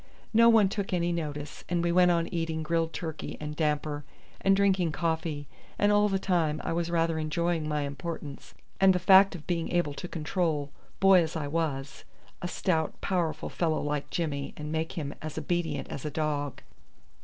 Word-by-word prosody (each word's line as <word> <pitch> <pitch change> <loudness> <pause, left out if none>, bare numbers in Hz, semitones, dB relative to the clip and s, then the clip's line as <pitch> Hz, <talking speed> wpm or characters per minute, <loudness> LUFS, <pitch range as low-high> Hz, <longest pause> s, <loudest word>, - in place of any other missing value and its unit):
No 230 +1 +7
one 220 -3 +6
took 195 0 -3
any 175 -1 +1
notice, 150 -3 -4
and 170 -1 +1
we 170 - +2
went 180 0 +5
on 170 -1 +2
eating 165 -2 -2
grilled 165 +1 0
turkey 160 -1 -5
and 150 0 -5
damper 150 -1 -1 0.4
and 195 0 +4
drinking 190 -5 +2
coffee, 160 -3 -2 0.3
and 205 0 +3
all 205 0 +4
the 195 - +1
time 170 -5 +1
I - - -1
was 170 0 -1
rather 165 -1 +1
enjoying 160 +1 -1
my 150 -1 0
importance 145 0 -6 0.2
and 195 -1 +6
the - - +3
fact 190 +2 +6
of 155 - -9
being 170 -2 -2
able 175 -5 +1
to 180 - -6
control, 155 -3 -1 0.3
boy 195 -2 +7
as 160 +1 -3
I 155 -3 -2
was, 145 -3 -2 0.4
a 175 - -2
stout 165 -3 -1
powerful 165 -5 -1
fellow 160 -3 0
like 145 -1 -2
Jimmy 145 -5 -3
and 150 0 -5
make 160 0 -2
him 150 -5 -4
as 155 0 -6
obedient 160 -1 -1
as 135 - -6
a 150 - -2
dog. 145 -3 -2
165 Hz, 185 wpm, -28 LUFS, 150-175 Hz, 0.4 s, No